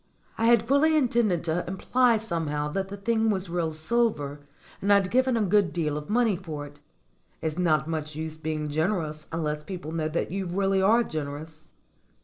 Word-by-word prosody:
I 225 - 0
had 230 -1 +4
fully 305 +4 +4
intended 235 - +2
to 170 +1 0
imply 235 +6 +2
somehow 160 -8 -2
that 190 +5 -2
the 200 +1 -7
thing 225 +2 +1
was 190 -4 -1
real 170 -2 0
silver 155 -4 0 0.4
and 200 - +1
I'd 200 -2 +4
given 255 -1 +3
a 220 - +2
good 200 -1 +3
deal 155 -4 -1
of 150 +3 -6
money 225 -2 +3
for 160 -5 -6
it. 145 0 -14 0.6
It's 160 +1 -3
not 155 -4 +2
much 155 -2 -3
use 160 0 -4
being 155 -1 -3
generous 155 -1 -1
unless 150 -2 -2
people 175 -1 -6
know 160 -1 -1
that 155 +1 -2
you 190 0 -2
really 195 +2 +1
are 225 +5 +4
generous. 155 -1 -6
175 Hz, 180 wpm, -26 LUFS, 155-210 Hz, 0.6 s, had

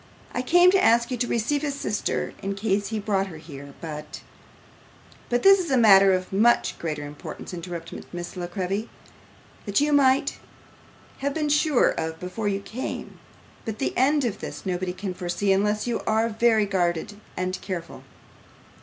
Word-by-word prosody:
'I 250 - -1
came 350 +7 +5
to 380 -1 +3
ask 235 +2 +4
you 250 - -1
to 245 +1 0
receive 235 +6 0
his 290 -2 -2
sister 210 -7 -2
in 195 0 -3
case 200 0 0
he 220 - -3
brought 200 -2 0
her 165 -4 -9
here, 140 -3 -11
but 150 -2 -7 0.5
' - - -26
'But 245 0 +1
this 390 0 +8
is 350 -3 -3
a 265 - +3
matter 195 -4 +7
of 185 0 -1
much 230 +5 +3
greater 150 -3 -3
importance,' 145 +5 -8
interrupted 170 -1 -7
Miss 175 0 -6
La 175 -1 -4
Creevy; 190 +5 -3 0.8
'that 200 - +2
you 295 +1 +2
might 270 -2 +3 0.8
have 280 0 -2
been 305 -2 0
sure 295 -2 +3
of 160 0 -3
before 180 +4 -4
you 200 -1 -1
came, 235 +5 -6 0.4
but 220 -1 -5
the 270 - -2
end 280 +2 +3
of 220 -4 -2
this, - - -7
nobody 180 -1 -2
can 190 0 -5
foresee, 180 +3 -1
unless 210 +2 +1
you 240 -2 -1
are 220 +1 +2
very 225 -1 +3
guarded 185 +1 -1 0.2
and 185 0 -2
careful. 175 -4 -6
205 Hz, 175 wpm, -25 LUFS, 180-245 Hz, 0.8 s, this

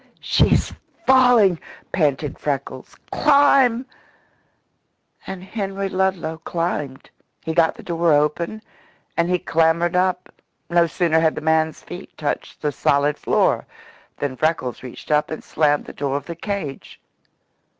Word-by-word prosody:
"She's - - +2 0.3
falling!" 245 -9 +5 0.3
panted 150 -4 0
Freckles. 135 -2 -4 0.2
"Climb!" 275 -4 +4 1.4
And 190 -1 -6
Henry 195 -1 -4
Ludlow 185 -4 -1
climbed. 160 -5 -4 0.3
He 160 - -3
got 165 -1 +3
the - - -12
door 170 -1 +1
open, 155 +8 0 0.5
and 170 +1 +1
he 180 - +2
clambered 165 +1 +1
up. 185 0 0 0.4
No 170 -1 +4
sooner 160 +1 +1
had 160 -1 +2
the - - -5
man's 160 0 +1
feet - - -10
touched - - -4
the 150 - +1
solid 140 +1 +1
floor - - +1 0.5
than 140 -2 -3
Freckles 155 -5 -1
reached 130 +4 -9
up 150 0 +2
and 155 - -6
slammed 150 -1 +1
the - - -9
door 140 -1 -2
of 140 - -7
the 170 - -6
cage. 170 -6 -5
165 Hz, 130 wpm, -21 LUFS, 150-185 Hz, 1.4 s, falling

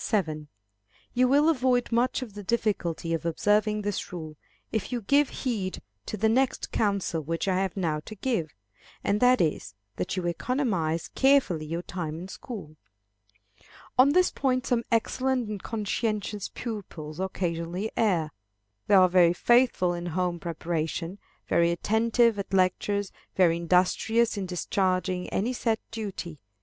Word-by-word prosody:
You 255 +1 +4
will 285 +4 +4
avoid 255 -6 +2
much 245 +3 +1
of 225 -5 -10
the 205 - -7
difficulty 185 -6 -1
of 165 - -1
observing 210 +5 +1
this 205 -1 -3
rule, 160 -3 -7 0.4
if 220 +2 -2
you 245 -1 -2
give 285 +6 +3
heed 210 -8 -3 0.3
to 215 - -3
the 220 +2 +2
next 255 +4 +1
counsel 200 -6 0
which 165 +5 -3
I 185 -1 +2
have 190 0 -2
now 160 -5 0
to 215 - -8
give, 205 - -1 0.5
and 205 +1 +1
that 250 0 +5
is, 155 - -1 0.2
that 90 - -2
you 180 - -2
economize 175 - -1
carefully 265 - +3
your 165 +3 -3
time 165 -3 -5
in 175 +3 -7
school. 190 -10 -8 1.2
On 270 +3 +6
this 365 +1 +4
point 255 -2 0
some 240 -3 0
excellent 255 +2 +1
and 210 -2 -5
conscientious 210 -1 -2
pupils 180 -9 -7
occasionally 180 +1 -2
err. 175 -9 +1 0.6
They 205 - +5
are 185 -1 +7
very 175 -1 +5
faithful 240 -4 +3
in 175 0 -4
home 175 0 -1
preparation; 165 +2 -3 0.3
very 170 0 +3
attentive 225 +4 +2
at 195 0 -3
lectures; 195 +2 +1 0.2
very 170 -3 +4
industrious 185 +7 +2
in 195 -2 -3
discharging 185 0 -1
any 235 +6 -1
set 225 -2 0
duty. 195 -8 -5
200 Hz, 145 wpm, -27 LUFS, 170-230 Hz, 1.2 s, are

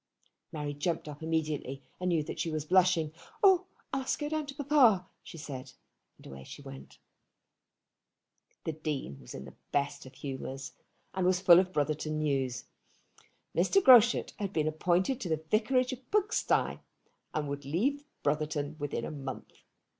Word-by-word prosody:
Mary 150 -2 -3
jumped 160 +3 -2
up 150 0 -8
immediately, 155 -4 -2 0.2
and 180 0 0
knew 165 -3 +2
that - - -6
she 165 - 0
was 155 -1 -3
blushing. 175 -3 +3 0.3
"Oh! 375 -2 +6 0.3
I 270 - +1
must 260 - -1
go 295 - -3
down 310 -1 -2
to 275 - -7
papa," 265 -10 +4 0.2
she - - -11
said. 135 -4 -7 0.4
And - - -18
away 70 0 -9
she 140 - -10
went. 135 -1 -11 1.7
The - - -1
Dean 150 - -4
was 65 - -10
in - - -6
one 65 - -9
of - - -17
his - - -35
best 145 0 -1
humours, 135 0 -6 0.4
and 190 - -1
was 180 0 +3
full 180 -2 +8
of 185 0 0
Brotherton 155 0 -1
news. 135 -5 0 0.9
Mr. 390 - +4
Groschut 245 - +6
had 200 -2 -2
been 155 -4 0
appointed 180 - +1
to 180 - -3
the 160 0 -1
vicarage 255 +4 +2
of 255 0 -11
Pugsty, 420 +2 +1 0.6
and 150 -1 -1
would 140 0 -4
leave 235 - 0 0.2
Brotherton 150 0 -1
within 145 -5 -3
a - - -5
month. 135 -3 -7
155 Hz, 165 wpm, -31 LUFS, 145-205 Hz, 1.7 s, full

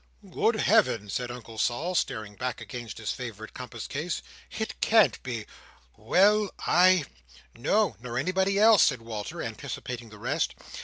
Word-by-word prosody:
"Good - - +1
Heaven!" 105 -2 +2
said 125 +3 -2
Uncle 115 -2 -8
Sol, 150 +12 0
starting 110 - -2
back 125 +2 -3
against 120 -3 -7
his 110 - -3
favourite 110 -4 -7
compass 120 -3 -7
case. 155 +5 -3 0.3
"It 220 - -5
can't 220 -2 +4
be! 115 -4 -5 0.5
Well, 200 - +3 0.2
I—" 180 -3 +5 0.5
"No, 175 - +1
nor 120 0 -5
anybody 190 +7 +1
else," 215 0 +7
said 125 -5 +3
Walter, 110 -3 -5
anticipating 120 -2 -6
the 105 - -13
rest. - - -1
125 Hz, 145 wpm, -27 LUFS, 115-185 Hz, 0.5 s, else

